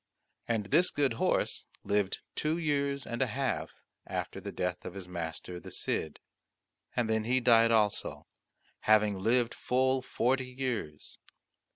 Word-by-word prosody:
And 115 -3 0
this 175 - +4
good 140 -5 +1
horse - - +1 0.2
lived 100 -2 0
two 155 +2 0
years 140 -4 0
and 120 +1 -4
a 130 - +3
half 130 0 -1 0.4
after - - -4
the - - -5
death 90 0 -2
of 90 - -7
his 95 -2 -7
master 85 0 -5
the - - -10
Cid, 80 - -2 0.8
and 120 -2 +1
then 110 -1 +1
he 130 +2 +3
died 115 -2 +6
also, 110 -3 +1 0.5
having 105 -2 +4
lived 115 +4 +2
full 130 +1 +1
forty 125 +1 0
years. 125 - -4
115 Hz, 145 wpm, -31 LUFS, 100-130 Hz, 0.8 s, died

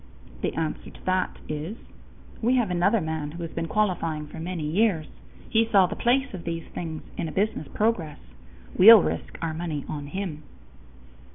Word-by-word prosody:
The - - -1
answer 160 -1 -3
to - - -16
that 185 0 0
is: 155 +8 -4 0.6
"We 240 +3 +3
have 235 -7 +1
another 190 +5 +3
man 160 -2 -3
who 170 0 -6
has 165 - -5
been 165 0 -3
qualifying 165 -7 0
for 150 - -10
many 170 0 -4
years. 170 0 +2 0.4
He 225 0 +2
saw 195 -3 +6
the - - -4
place 265 +2 +1
of 180 -3 -6
these 165 -1 -3
things 160 -2 -5
in 160 - -2
business 200 -7 0
progress. 195 -9 0 0.6
We'll 215 +1 +10
risk - - -3
our 165 -1 -1
money 155 -3 -4
on 145 -2 -5
him." 175 -2 -4
175 Hz, 170 wpm, -26 LUFS, 160-210 Hz, 0.6 s, We'll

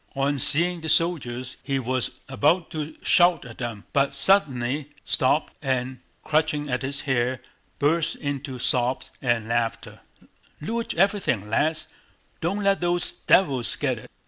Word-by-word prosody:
On 140 +1 0
seeing 170 +6 +4
the 160 - -5
soldiers 130 -7 0
he 140 -1 -2
was 130 -1 -1 0.2
about 150 +6 +1
to 155 0 -6
shout 175 -4 +4
at 115 -2 -12
them, 115 -4 -5
but 140 0 +1
suddenly 140 -4 +3 0.2
stopped 135 +4 +1
and, 130 -2 -2 0.2
clutching 150 -2 0
at 125 - -1
his 140 +1 -2
hair, 130 -1 -1 0.4
burst 155 +3 +1
into 140 -2 -5
sobs 125 +1 0
and 120 -4 0
laughter: 115 -1 -2 0.6
"Loot 230 +7 -3
everything, 190 - +1
lads! 155 +6 0 0.6
Don't 195 +5 -2
let 195 -1 +2
those 175 0 +1
devils 135 -10 +3
get - - -2
it!" - - -14
140 Hz, 140 wpm, -24 LUFS, 125-165 Hz, 0.6 s, seeing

